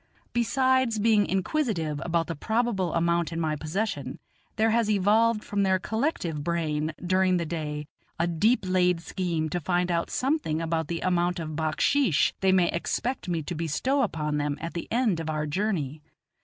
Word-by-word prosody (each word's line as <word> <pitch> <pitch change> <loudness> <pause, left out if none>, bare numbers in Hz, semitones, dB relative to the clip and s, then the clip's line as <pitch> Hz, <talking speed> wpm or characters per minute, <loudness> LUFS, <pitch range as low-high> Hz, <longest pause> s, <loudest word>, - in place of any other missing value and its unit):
Besides 260 -1 +2
being 210 -1 +3
inquisitive 190 - -1
about 170 -1 0
the 165 - -4
probable 220 -1 0
amount 170 0 +1
in 165 - -3
my 155 -2 0
possession, 155 - -3 0.4
there 220 +1 +2
has 230 -1 +2
evolved 215 +2 +3
from 205 -1 -1
their 190 -1 +3
collective 185 - -2
brain 155 -2 -1
during 185 0 +3
the 170 - -1
day, 150 -2 -4 0.3
a 170 - +1
deep 190 +9 +2
laid 180 -2 +2
scheme 170 -3 -2
to 175 - -1
find 180 +2 0
out 170 0 0
something 265 - 0
about 165 -1 -1
the 170 0 -3
amount 175 0 +1
of 155 -2 -5
backsheesh 160 - +2
they 190 -1 +3
may 185 -2 +4
expect 225 +5 -2
me 165 -2 -1
to 175 - -4
bestow 170 - 0
upon 150 - -1
them 145 0 -1
at 165 +1 -5
the 170 - -5
end 225 -7 +2
of 160 -1 -4
our 155 -1 -1
journey. 155 -4 -2
175 Hz, 170 wpm, -27 LUFS, 160-215 Hz, 0.4 s, may